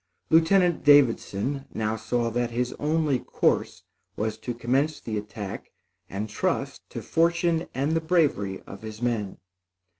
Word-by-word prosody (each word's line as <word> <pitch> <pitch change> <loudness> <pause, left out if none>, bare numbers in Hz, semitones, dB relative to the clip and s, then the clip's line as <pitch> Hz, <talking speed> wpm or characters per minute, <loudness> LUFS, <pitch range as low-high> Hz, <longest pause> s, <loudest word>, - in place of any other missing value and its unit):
Lieutenant 170 +2 +4
Davidson 135 -2 +3
now 110 0 0
saw 115 +1 -1
that 120 +1 0
his 125 +1 -2
only 150 -3 +1
course - - 0 0.3
was 110 +1 -2
to 120 - -4
commence 135 +6 0
the 110 - -5
attack 105 -1 -6 0.4
and 100 +3 -3
trust 105 - -2
to - - -6
fortune 170 0 +1
and 140 +4 0
the 165 0 +1
bravery 150 - +1
of 100 - -10
his 110 -1 -8
men. 115 -5 -2
125 Hz, 140 wpm, -26 LUFS, 110-155 Hz, 0.4 s, Lieutenant